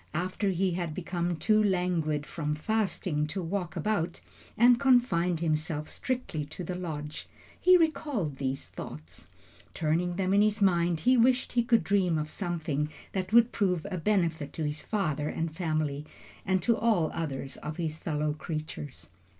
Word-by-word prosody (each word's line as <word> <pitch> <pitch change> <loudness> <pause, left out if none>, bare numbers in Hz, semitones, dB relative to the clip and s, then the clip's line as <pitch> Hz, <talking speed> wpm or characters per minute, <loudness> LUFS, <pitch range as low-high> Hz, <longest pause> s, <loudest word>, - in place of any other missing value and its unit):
After 185 +4 -1
he 185 0 +1
had 170 -3 -3
become 175 -1 -2
too 215 +7 +3
languid 175 -6 0
from 150 -2 -3
fasting 175 -4 -1
to 180 +4 -3
walk 175 -1 -3
about, 180 -5 -1 0.4
and 240 +1 +6
confined 195 - +3
himself 155 -1 -1
strictly 250 - -3
to 155 +5 -7
the 180 - -4
lodge, 155 -4 -5 0.3
he 365 0 +7
recalled 285 - 0
these 135 0 -2
thoughts. 80 +2 -9 0.5
Turning 170 +3 0
them 190 0 0
in 200 - +5
his 210 0 +2
mind, 175 -4 +2
he 255 +8 +4
wished 250 +2 +3
he 245 - +3
could 235 -3 +3
dream 180 -2 +2
of 155 0 -3
something 160 -6 -2 0.2
that 190 0 -3
would 235 +1 +6
prove 180 -5 0
a 185 - -2
benefit 165 -6 0
to 160 - -3
his 150 +1 -2
father 155 -8 -1
and 165 -1 -3
family, 155 -4 -1 0.4
and 185 -2 +2
to 235 - +3
all 215 -9 +2
others 140 -4 -4
of 150 +1 -6
his 160 -2 -3
fellow 150 -2 -1
creatures. 150 - -6
170 Hz, 160 wpm, -29 LUFS, 155-200 Hz, 0.5 s, he